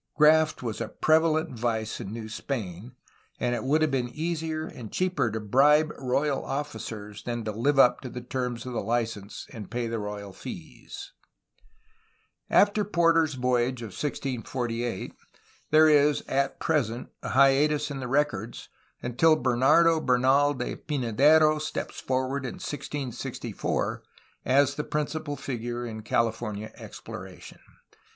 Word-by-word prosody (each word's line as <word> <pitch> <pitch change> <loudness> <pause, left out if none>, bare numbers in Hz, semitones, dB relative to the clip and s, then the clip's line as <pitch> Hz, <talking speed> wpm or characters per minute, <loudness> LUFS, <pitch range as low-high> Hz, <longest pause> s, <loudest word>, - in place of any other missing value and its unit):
Graft 155 -1 +4
was 115 -2 -3
a 115 - -2
prevalent 155 +3 +2
vice 115 -2 -2
in 95 - -6
New 110 -1 -6
Spain, 110 -2 -5 0.5
and 125 0 0
it 120 - -2
would 150 +4 +2
have 155 - +1
been 125 -2 0
easier 160 +2 -3
and 115 -8 -9
cheaper 185 -9 0
to 110 +1 -3
bribe 145 +8 +4
royal 135 +2 0
officers 110 -6 -5
than 120 0 -4
to 110 - -2
live 130 +7 +1
up 125 -2 +5
to 130 - -6
the 125 - -6
terms 125 -1 -3
cf, 125 - -6
the - - -1
license 110 -2 -3
and 105 -4 -8
pay 120 0 -2
the 115 0 -2
royal 105 -1 -6
fees. - - -9 1.4
After 205 +1 +4
Porter's 165 -5 +3
voyage 125 -1 0
of 115 - -6
1648, 120 -3 -3 0.6
there 155 +1 +6
is 150 -1 +4
(at 135 0 0
present) 125 -7 -1
a - - -5
hiatus 145 +2 +3
in 140 - -4
the 130 - -4
records, 135 -5 -1 0.3
until 155 +7 +4
Bernardo 145 +6 +4
Bernal 135 +3 +3
de 125 -1 -4
Pynadero 150 +4 +3
steps 155 - -4
forward 130 +1 -1
in 130 - -4
1664 145 -7 -4 0.4
as 140 +2 +4
the 150 - -3
principal 150 0 -3
figure 120 -2 -4
in 110 -2 -6
California 110 -1 -1
exploration. - - -10
130 Hz, 140 wpm, -27 LUFS, 115-150 Hz, 1.4 s, there